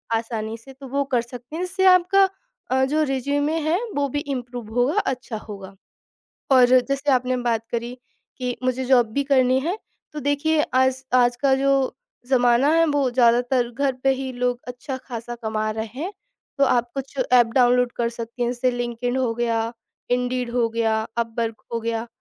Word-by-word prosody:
आसानी 225 -1 -3
से। 265 +4 -14
तो 270 0 -11
वो 280 +2 0
कर 240 - +3
सकते 245 +4 -10
हैं, 345 - -2
जिससे 380 +1 -1
आपका 375 +1 +5 0.4
अ, 265 0 +3
जो 300 +4 +1
रिज़्यूमे 285 +3 0
है, 335 - +3 0.2
वो 285 0 +1
भी 290 - -2 0.2
इम्प्रूव 245 -3 -7
होगा, 245 +4 +2
अच्छा 250 -4 -3
होगा। 195 -3 -10 0.8
और 255 -2 +7 0.2
जैसे 275 +1 0
आपने 255 0 +1
बात 235 -2 0
करी 235 +1 -3 0.4
कि 250 -1 -2
मुझे 255 0 0
जॉब 250 -2 +4
भी 280 - +1
करनी 260 -2 +3
है 345 +8 -2 0.4
तो 300 - -4
देखिए 290 +2 +1
आज 260 0 +2
आज 245 -1 +4
का 275 -2 +4
जो 275 +1 +2 0.6
ज़माना 245 +1 +4
है 330 0 +4
वो 285 -3 +1
ज़्यादातर 245 0 +3
घर 275 +3 0
पे 270 - +4
ही 265 0 -4
लोग 245 0 -1
अच्छा 250 +2 -5
ख़ासा 240 -2 -7
कमा 215 0 -1
रहे 220 +1 -3 0.2
हैं। 365 +5 -3 0.5
तो 280 - +4
आप 240 -2 +1
कुछ 275 0 -6 0.2
ऐप 240 -2 +6
डाउनलोड 250 -1 +4
कर 235 -1 +1
सकती 235 +1 -5
हैं 240 - 0
जैसे 250 +1 0
लिंक्डइन 245 +1 -2
हो 250 -3 0
गया, 230 -1 -1 0.4
इंडीड 250 0 0
हो 240 -1 +2
गया, 225 -1 0 0.2
अपवर्क 230 -1 -2
हो 230 - 0
गया। 230 0 -2
250 Hz, 180 wpm, -23 LUFS, 235-270 Hz, 0.8 s, और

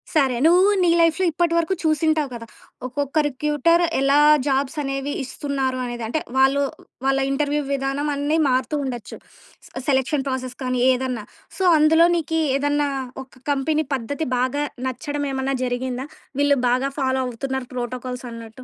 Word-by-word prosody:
సరే. 270 -5 +3
నువ్వు 360 +4 +6
నీ 350 - +4
లైఫ్‌లో 335 +2 +3
ఇప్పటి 335 +1 +1
వరకు 335 +2 +1
చూసింటావు 310 -1 +1
కదా! 230 -1 -8 0.4
ఒక్కొక్క 280 +3 -3
రిక్రూటర్ 300 +5 +2 0.2
ఎలా 275 +2 +4 0.3
జాబ్సనేవి 275 0 -1
ఇస్తున్నారు 270 -1 -2
అనేది. 240 -1 -5
అంటే 275 +8 -1 0.2
వాళ్ళు 270 +1 +4 0.4
వాళ్ళ 270 0 +2
ఇంటర్వ్యూ 290 +1 0
విధానం 275 +2 -1
అన్ని 290 +3 0
మారుతూ 255 +3 0
ఉండచ్చు. 240 -5 -6 0.7
సెలక్షన్ 270 +1 +1
ప్రాసెస్ 255 -1 -3
కానీ 255 -1 -1
ఏదన్నా. 255 -3 -2 0.3
సో, 380 - -1
అందులో 320 +2 +5
నీకీ 325 -1 -1 0.2
ఏదన్నా 290 +1 +1 0.4
ఒక 260 -1 -21
కంపెనీ 300 +3 0
పద్ధతి 285 +6 -3
బాగా 260 +4 0 0.2
నచ్చడమేమన్నా 270 0 -2
జరిగిందా? 250 +1 -3 0.3
వీళ్ళు 285 0 +4
బాగా 255 +3 +1
ఫాలో 260 -1 +1
అవుతున్నారు 260 +1 -4
ప్రోటోకాల్సన్నట్టు. 245 -1 -6
275 Hz, 130 wpm, -22 LUFS, 255-295 Hz, 0.7 s, నువ్వు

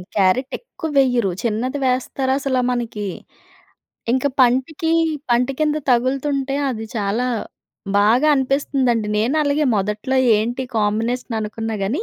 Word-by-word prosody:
Carrot 205 +7 +2
ఎక్కువెయ్యరు. 270 - 0
చిన్నది 245 +5 -2
వేస్తారసలా 260 +1 0
మనకి, 230 -4 -3 1.1
ఇంక 260 +1 0 0.2
పంటకీ 265 +6 +2 0.4
పంటికింద 275 +5 +1
తగులుతుంటే 270 +2 0
అది 225 -3 -4
చాలా 215 +4 0 0.7
బాగా 235 +9 +4
అనిపిస్తుందండి. 265 -4 0
నేను 240 +7 +1
అలాగే 290 +1 +1
మొదట్లో 210 +6 -1 0.2
ఏంటి 240 +4 -1
కాంబినేషన్ 225 +3 -1
అనుకున్నా 220 +1 -4
కాని, 235 - -1
250 Hz, 100 wpm, -20 LUFS, 225-275 Hz, 1.1 s, బాగా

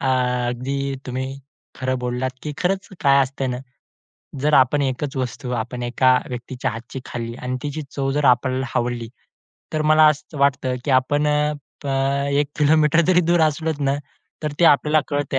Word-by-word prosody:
अ, - - -2 0.4
अगदी 125 +3 -3 0.3
तुम्ही 130 +1 -3 0.5
खरं 130 0 -1
बोललात, 125 +1 -2
की 150 - -4
खरंच 190 +2 -1
काय 140 -2 +5
असते 135 0 -3
ना, 125 -1 -2 0.8
जर 150 +2 +2
आपण 135 +2 +4
एकच 135 +2 -2
वस्तू 130 0 -4
आपण 120 +2 -5
एका 130 +1 +3
व्यक्तीच्या 125 0 -4
हातची 120 +4 -7
खाल्ली 115 -1 -5
आणि 125 0 -2
तिची 145 +1 -4
चव 135 -1 -2
जर 145 +1 0
आपल्याला 130 +1 +2
हवली, 120 -1 -1 0.6
तर 155 - 0
मला 155 0 +7
असंच 150 +1 -2
वाटतं, 135 -2 +2
की - - -1
आपण 145 +3 0
अ, 150 0 +2 0.3
अ, - - -3 0.4
1 145 +1 +1
किलोमीटर 150 +2 +4
जरी 180 -1 +5
दूर 175 -1 +4
असलो 160 +1 +1
ना, 140 0 +1 0.5
तर 150 - -2
ते - - +6
आपल्याला 150 0 +5
कळतंय. 145 -2 -1
135 Hz, 170 wpm, -22 LUFS, 125-150 Hz, 0.8 s, मला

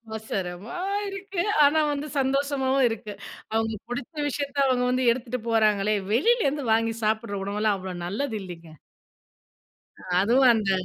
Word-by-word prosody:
அவசரமா 195 - -5 0.3
இருக்கு, 390 -2 -4 0.2
ஆனா 290 +2 +5
வந்து 290 +1 -3
சந்தோஷமாவும் 270 -1 +1
இருக்கு. 215 -2 -6 0.4
அவுங்க 225 0 0
பிடித்த 245 +5 -5
விஷயத்த 285 0 -4
அவுங்க 250 -1 +2
வந்து 255 0 +1
எடுத்துட்டு 250 0 -5
போறாங்களே, 215 -2 +3 0.2
வெளிலேருந்து 295 - +2
வாங்கி 225 0 +1
சாப்பிடுற 215 -1 0
உணவெல்லாம் 210 0 0
அவ்வளோ 185 -1 -6
நல்லது 220 +6 -2
இல்லைங்க. 170 -3 -10 1.5
அதுவும் 245 +5 +5
அந்த 210 -3 0
230 Hz, 120 wpm, -25 LUFS, 210-275 Hz, 1.5 s, ஆனா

